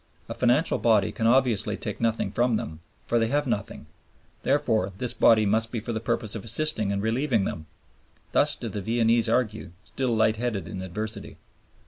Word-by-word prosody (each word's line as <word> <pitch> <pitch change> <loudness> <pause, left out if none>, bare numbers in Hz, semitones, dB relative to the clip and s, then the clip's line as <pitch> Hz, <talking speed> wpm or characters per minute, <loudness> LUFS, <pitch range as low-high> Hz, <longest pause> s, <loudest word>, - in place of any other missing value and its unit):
A - - -5
financial 125 +7 +2
body 110 -4 +3
can 115 - -1
obviously 120 -4 +2
take 105 0 -6
nothing 115 -1 0
from 120 -1 +1
them, 80 -6 -5 0.3
for 120 - +1
they 115 - +2
have 145 +4 0
nothing; 105 -6 -3 0.6
therefore 110 -9 +1
this 120 +2 +1
body 110 -2 +4
must 110 +2 +1
be 120 - -2
for 115 +2 -4
the 110 - -2
purpose 115 -2 -2
of 110 - -5
assisting 115 -4 0
and 100 0 -2
relieving 115 0 +1
them. 80 -1 -5 0.6
Thus - - +2
do - - -6
the 105 - -4
Viennese 115 +2 +2
argue, 110 -6 -1
still 125 -3 -2
light 110 0 +2
headed 115 -4 -3
in 95 - -6
adversity. 105 +4 -4
115 Hz, 180 wpm, -26 LUFS, 105-120 Hz, 0.6 s, body